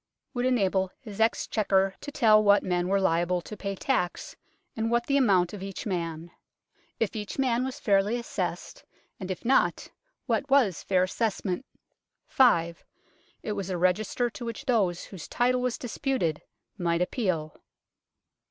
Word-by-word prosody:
Would 245 0 0
enable 195 -6 +1
his 215 -3 -7
Exchequer 195 -3 +2
to 290 - -7
tell 215 -6 +5
what 205 0 +5
men 180 -1 0
were 195 +1 +2
liable 175 -1 +1
to 215 - -9
pay 200 -1 -4
tax, 185 -5 -2 0.4
and 225 0 -1
what 235 0 +1
the 275 - +1
amount 195 -10 +3
of 205 - -7
each 195 -1 -6
man; 170 -4 -3 0.7
if 225 -2 -1
each 210 -2 -5
man 250 -2 +1
was 265 +2 -4
fairly 200 +1 +2
assessed, 235 - -4 0.4
and 190 -2 -6
if 185 - -5
not 265 +3 +2 0.4
what 280 - -1
was 250 - +3
fair 185 -1 +2
assessment. 205 +3 -2 0.6
5. 170 -10 +3 0.6
It - - -3
was 200 -2 -3
a 185 - -1
register 185 +7 +1
to 240 - -8
which 230 +4 -6
those 200 -9 +1
whose 185 -5 -9
title 250 +1 +1
was 250 -1 -1
disputed 245 - -2 0.4
might 170 0 +1
appeal. 180 - -2
200 Hz, 150 wpm, -27 LUFS, 180-240 Hz, 0.7 s, tell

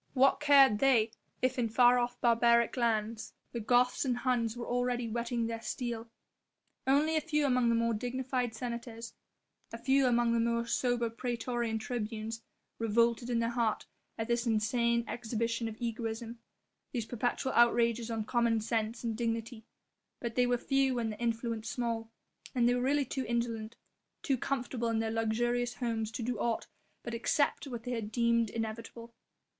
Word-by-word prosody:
What 270 +1 +4
cared 275 -7 +6
they 240 -5 +4 0.3
if 255 0 +1
in 230 -2 +1
far 245 +2 +5
off 245 0 -2
barbaric 235 0 +4
lands 225 -2 -1 0.2
the 235 - -4
Goths 245 +3 +3
and 250 -3 0
Huns 245 -3 0
were 240 - -4
already 245 -1 0
whetting 235 +1 -1
their 230 0 -4
steel. 230 -1 -4 0.8
Only 295 +4 +3
a 310 - +2
few 300 -2 0
among 250 -3 +3
the 230 - +3
more 230 0 +1
dignified 250 +1 -2
senators, 235 -1 -6 0.6
a 230 - -5
few 265 +3 +3
among 240 -1 +3
the 235 - +2
more 235 0 +1
sober 240 0 0
praetorian 235 -1 -2
tribunes, 225 0 -4 0.4
revolted 230 +2 +2
in 240 - +1
their 230 0 0
heart 235 -3 0 0.3
at 225 -1 -3
this 235 0 0
insane 235 +2 +1
exhibition 230 0 -2
of 220 -1 -7
egoism, 230 0 -4 0.5
these 235 -5 -2
perpetual 245 +3 -1
outrages 235 -1 +3
on 225 -1 -2
common 235 -1 +2
sense 220 +1 -2
and 230 -2 -1
dignity; 230 0 -3 0.5
but 235 -1 -4
they 250 0 +3
were 245 0 +2
few 270 0 +1
and 230 -2 -1
their 210 - -8
influence 230 -1 -2
small, 230 -1 -2 0.5
and 240 -2 +3
they 245 - +4
were 245 - 0
really 280 +2 +2
too 260 +1 -3
indolent, 230 -1 -2 0.5
too 275 - +2
comfortable 250 -3 -2
in 225 - 0
their 225 0 0
luxurious 240 +2 0
homes 225 -3 -2
to 230 +1 -5
do 240 -2 -2
aught 230 0 -1 0.4
but 235 - -5
accept 280 +5 0
what 240 -4 -6
they 245 -2 -2
deemed 235 +1 +1
inevitable. 230 +1 -6
235 Hz, 165 wpm, -31 LUFS, 225-245 Hz, 0.8 s, cared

